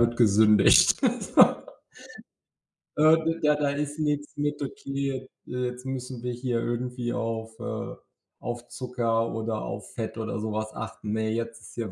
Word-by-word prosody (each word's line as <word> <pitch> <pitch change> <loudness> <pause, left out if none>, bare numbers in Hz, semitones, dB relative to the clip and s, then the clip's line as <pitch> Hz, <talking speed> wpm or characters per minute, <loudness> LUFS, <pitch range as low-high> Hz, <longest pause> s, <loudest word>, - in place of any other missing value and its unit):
wird 120 0 +3
gesündigt.” 105 -2 +6 0.2
So - - +7 1.5
Äh, 155 +1 +7
d 165 +1 0
da 150 0 +5
da, 145 -1 +1
ist 145 +1 -3
nix 150 -1 -1
mit 145 0 -1
„okay, 135 -1 -3 0.2
äh, - - -12 0.2
jetzt 125 +1 -7
müssen 130 -2 -5
wir 125 - -1
hier 120 0 -1
irgendwie 120 +1 -2
auf, 115 0 -3
äh - - -4 0.4
auf 120 0 -5
Zucker 120 -2 -1
oder 110 -1 -2
auf 100 0 -6
Fett 110 -2 -4
oder 115 0 -3
so 110 0 -3
was 110 0 -2
achten. 110 -1 -6
Ne, 110 0 0
jetzt 115 0 -3
ist 100 - -13
hier 115 -4 -3
120 Hz, 160 wpm, -27 LUFS, 115-135 Hz, 1.5 s, So